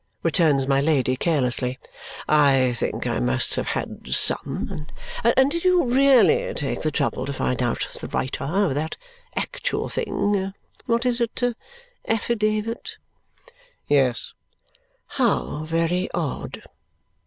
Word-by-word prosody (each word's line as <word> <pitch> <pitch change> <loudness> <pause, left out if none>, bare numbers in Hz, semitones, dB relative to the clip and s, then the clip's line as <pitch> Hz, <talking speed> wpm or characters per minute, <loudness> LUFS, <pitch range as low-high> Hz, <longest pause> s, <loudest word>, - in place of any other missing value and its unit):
returns 155 -5 +3
my 135 0 +3
Lady 140 -4 +2
carelessly. 130 -4 +1 0.5
"I 135 -4 +4
think 115 - -3
I - - 0
must 60 0 +1
have - - -2
had - - -4
some. 150 0 0 0.4
And 265 +4 +4
did 335 +1 -2
you 365 -1 +4
really 250 - +4
take 140 - -2
the 155 - +1
trouble 135 -3 -1
to - - -2
find 125 -2 -1
out 120 -2 -1
the - - -5
writer 130 - -2
of 180 +1 +1
that 155 +3 -3 0.4
actual - - -2
thing 195 -1 -1 0.3
what 235 0 +1
is 245 -1 +2
it! 235 -1 -1 0.7
affidavit?" 220 0 -1 0.9
"Yes." 135 -5 +2 0.9
"How 175 -9 0
very 165 +3 0
odd!" 165 -5 -4
160 Hz, 120 wpm, -23 LUFS, 135-225 Hz, 0.9 s, I